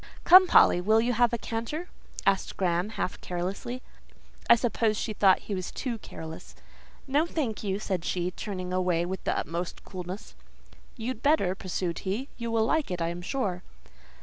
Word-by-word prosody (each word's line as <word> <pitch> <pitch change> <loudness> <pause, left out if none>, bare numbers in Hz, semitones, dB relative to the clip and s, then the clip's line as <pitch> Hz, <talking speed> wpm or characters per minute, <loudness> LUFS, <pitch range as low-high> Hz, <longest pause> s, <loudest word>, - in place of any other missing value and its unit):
"Come, 370 +1 +9
Polly, 175 - +6
will 215 +4 +4
you 240 +2 +1
have 240 0 +3
a 235 - 0
canter?" 235 +10 -4 0.4
asked 195 -1 +1
Graham, 180 +1 +1
half - - -3
carelessly. 195 +8 -4 0.7
I - - +10
suppose 225 -2 +1
she 220 - -2
thought 195 -2 +4
he 205 - -5
was 185 -2 -3
too 240 -4 -4
careless. 160 -4 -9 0.5
"No, 290 +4 +2
thank 255 -12 -2
you," 195 -2 -1
said 190 -4 -2
she, 180 0 -1
turning 185 -2 -5
away 180 -2 +1
with 190 +2 -5
the - - +1
utmost 170 +3 -4
coolness. 185 +2 -7 0.6
"You'd 235 0 -4
better," 280 - +3
pursued 185 -2 -3
he. 210 +8 -3
"You 235 -1 -4
will 225 -1 +2
like 310 +5 +1
it, 180 -1 -3
I 165 0 0
am 175 +1 -5
sure." 185 -3 -2
200 Hz, 175 wpm, -28 LUFS, 180-235 Hz, 0.7 s, I